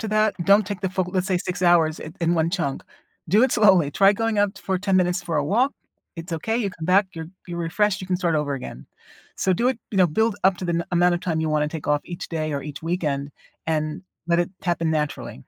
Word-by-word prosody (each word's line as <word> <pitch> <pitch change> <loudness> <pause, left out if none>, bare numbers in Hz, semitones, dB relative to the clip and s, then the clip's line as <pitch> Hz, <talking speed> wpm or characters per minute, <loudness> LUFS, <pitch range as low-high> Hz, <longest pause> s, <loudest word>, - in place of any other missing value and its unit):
to 220 - -4
that, 215 0 +2
don't 200 0 +5
take 200 -3 -5
the 190 - -2
full, 185 -1 0
let's 185 0 0
say 185 -3 +1
6 180 0 -4
hours 165 -3 +4
in 160 +2 -8
in 170 +1 +2
one 165 0 +1
chunk. 165 -7 -2 0.5
Do 210 +7 +4
it 260 - +3
slowly. 190 -8 +4
Try 195 +5 +5
going 225 0 -1
out 205 -1 +1
for 190 -1 -2
10 195 -1 +1
minutes 180 -1 +1
for 170 - -2
a 150 - +1
walk, 245 - +2 0.4
it's 165 +1 -7
okay, 220 +8 -1
you 205 -5 -1
come 160 -3 -8
back, 190 +2 +4
you're 160 -1 -7 0.2
you're 170 -1 -5
refreshed, 190 +4 0
you 185 - -7
can 180 -1 0
start 175 -3 0
over 145 -2 0
again. 95 - -8 0.5
So 190 - +1
do 240 +7 +1
it, 260 - -1
you 195 - -1
know, 180 - +6
build 220 +6 0
up 190 -1 +4
to - - -5
the 175 - -1
n 170 - -1
amount 175 0 +4
of 175 - -3
time 160 -3 -1
you 160 - -1
wanna 150 -1 +1
take 160 -1 -7
off 145 0 +2
each 175 -1 -7
day 155 -2 -2
or 140 -1 -3
each 150 +1 -8
weekend, 150 -5 -2 0.4
and 155 +2 -2 0.2
let 170 0 +2
it 175 - -2
happen 170 -2 0
naturally. 145 -7 -2
175 Hz, 255 wpm, -23 LUFS, 160-195 Hz, 0.5 s, know